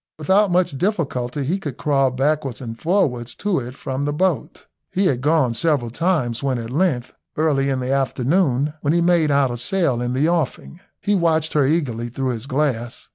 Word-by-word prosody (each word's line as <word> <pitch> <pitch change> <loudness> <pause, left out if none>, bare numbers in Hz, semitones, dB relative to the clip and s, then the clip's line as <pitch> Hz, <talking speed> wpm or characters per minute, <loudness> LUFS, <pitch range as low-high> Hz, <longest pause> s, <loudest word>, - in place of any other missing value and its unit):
Without 190 +6 +3
much 175 -6 +1
difficulty 145 - -1
he 170 +9 -1
could 145 -9 -6
crawl 135 -2 +2
backwards 135 0 -1
and 115 -3 -7
forwards 130 - 0
to 200 -5 0
it 125 +1 -7
from 135 0 -4
the 145 - 0
boat. 165 -3 -1 0.2
He 195 +2 0
had 130 -8 +1
gone 145 -4 +2
several 140 -4 0
times, 145 -6 0
when 135 -2 0
at 115 0 -6
length, 140 -5 0 0.2
early 145 -3 +2
in 135 -1 0
the 125 +1 -2
afternoon, 140 +2 +1
he 155 +4 +2
made 170 -2 +3
out 140 -2 +3
a 120 - -4
sail 130 -2 0
in 125 0 -1
the 140 +5 +2
offing. 165 0 -2 0.2
He 205 - +1
watched 160 -4 +1
her 145 -3 +3
eagerly 125 -7 -1
through 130 +2 -2
his 120 +1 -6
glass. 130 -4 -2
140 Hz, 185 wpm, -21 LUFS, 125-165 Hz, 0.2 s, Without